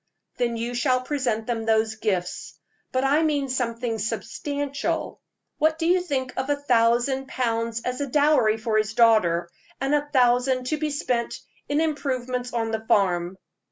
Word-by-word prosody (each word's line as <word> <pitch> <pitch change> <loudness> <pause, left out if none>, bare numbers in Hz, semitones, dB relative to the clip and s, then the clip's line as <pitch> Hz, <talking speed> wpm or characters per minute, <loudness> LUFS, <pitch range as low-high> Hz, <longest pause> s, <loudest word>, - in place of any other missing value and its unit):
"Then 235 -1 0
you 235 +2 -3
shall 255 +1 +1
present 255 -5 -1
them 230 -1 -2
those 220 0 +2
gifts. 190 -5 -3 0.3
But 255 +1 0
I 290 +3 +3
mean 290 -4 0
something 235 -2 -2
substantial. 280 +6 -3 0.4
What 315 +1 +3
do 325 - -2
you 360 +2 +4
think 265 -7 -2
of 265 +2 -2
a 290 - +3
thousand 255 0 +2
pounds 230 -2 -1
as 250 +3 -3
a 285 - -1
dowry 275 -6 +3
for 220 -1 +1
his 215 0 -2
daughter, 195 -8 +4 0.3
and 270 +2 0
a 290 0 +1
thousand 255 -1 +3
to 310 - 0
be 305 0 -1
spent 250 -5 -2 0.3
in 290 +1 +1
improvements 255 -5 -2
on 225 -2 -1
the 220 0 -3
farm?" 180 -2 +1
250 Hz, 160 wpm, -24 LUFS, 225-280 Hz, 0.4 s, you